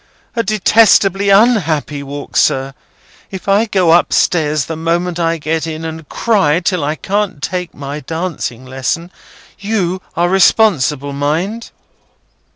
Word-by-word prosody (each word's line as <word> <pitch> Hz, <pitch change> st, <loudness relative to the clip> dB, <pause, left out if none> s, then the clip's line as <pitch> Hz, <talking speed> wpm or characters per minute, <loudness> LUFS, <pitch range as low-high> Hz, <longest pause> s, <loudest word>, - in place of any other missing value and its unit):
A 230 Hz, -, +1 dB
detestably 205 Hz, -2 st, +3 dB
unhappy 185 Hz, -, +2 dB
walk, 140 Hz, +1 st, -8 dB
sir. 135 Hz, +1 st, +1 dB, 0.6 s
If 190 Hz, 0 st, -8 dB
I 200 Hz, +3 st, +3 dB
go 185 Hz, -5 st, +2 dB
up 170 Hz, +1 st, +4 dB
stairs 150 Hz, -4 st, +1 dB
the 165 Hz, -, -5 dB
moment 170 Hz, +2 st, -1 dB
I 165 Hz, 0 st, 0 dB
get 160 Hz, +1 st, -2 dB
in 160 Hz, 0 st, -5 dB
and 160 Hz, -2 st, -7 dB
cry 190 Hz, -9 st, +1 dB
till 180 Hz, -3 st, -1 dB
I 150 Hz, +2 st, -1 dB
can't 200 Hz, -2 st, -2 dB
take 180 Hz, +4 st, -4 dB
my 140 Hz, +1 st, -6 dB
dancing 160 Hz, -5 st, -5 dB
lesson, 135 Hz, +7 st, -3 dB, 0.5 s
you 190 Hz, -3 st, -2 dB, 0.2 s
are 175 Hz, +1 st, +2 dB
responsible, 170 Hz, -, +2 dB
mind!" 165 Hz, +11 st, -2 dB
170 Hz, 135 wpm, -15 LUFS, 150-195 Hz, 0.6 s, up